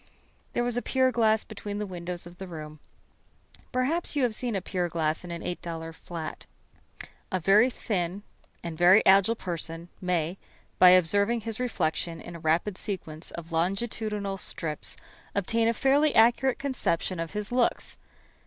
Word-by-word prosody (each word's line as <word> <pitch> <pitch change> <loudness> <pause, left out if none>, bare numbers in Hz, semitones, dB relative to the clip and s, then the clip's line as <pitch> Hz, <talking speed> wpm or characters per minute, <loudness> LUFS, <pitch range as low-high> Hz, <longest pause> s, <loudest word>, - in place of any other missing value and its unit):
There 240 - +1
was 245 0 0
a - - +1
pier 260 0 +2
glass 220 -2 +3
between 205 -1 -6
the 210 - -2
windows 175 -2 -5
of 175 0 -13
the 190 - -6
room. 155 -3 -8 0.9
Perhaps 280 +7 0
you 285 - +2
have 240 -3 +2
seen 235 0 -2
a - - +1
pier 180 -1 -2
glass 160 -1 -1
in 175 - -8
an 170 0 -5
$8 165 -2 -5
flat. 165 -1 -7 0.8
A 185 - 0
very 205 +8 +5
thin 195 -5 -3 0.4
and 170 -2 -5
very 180 +5 +6
agile 195 +4 +6
person 170 -3 -4
may, 180 -1 -1 0.4
by 180 - +9
observing 200 +6 +4
his 225 0 -3
reflection 170 -8 -1
in 175 +2 -9
a - - -8
rapid 170 +5 0
sequence 165 -5 -5
of 170 0 -9
longitudinal 200 +3 -1
strips, 155 -4 -3 0.4
obtain 225 +3 +1
a - - +4
fairly 285 +5 +3
accurate 240 +3 +4
conception 255 -10 -1
of 165 -1 -4
his 210 +1 -4
looks. 245 -1 0
190 Hz, 160 wpm, -28 LUFS, 170-230 Hz, 0.9 s, by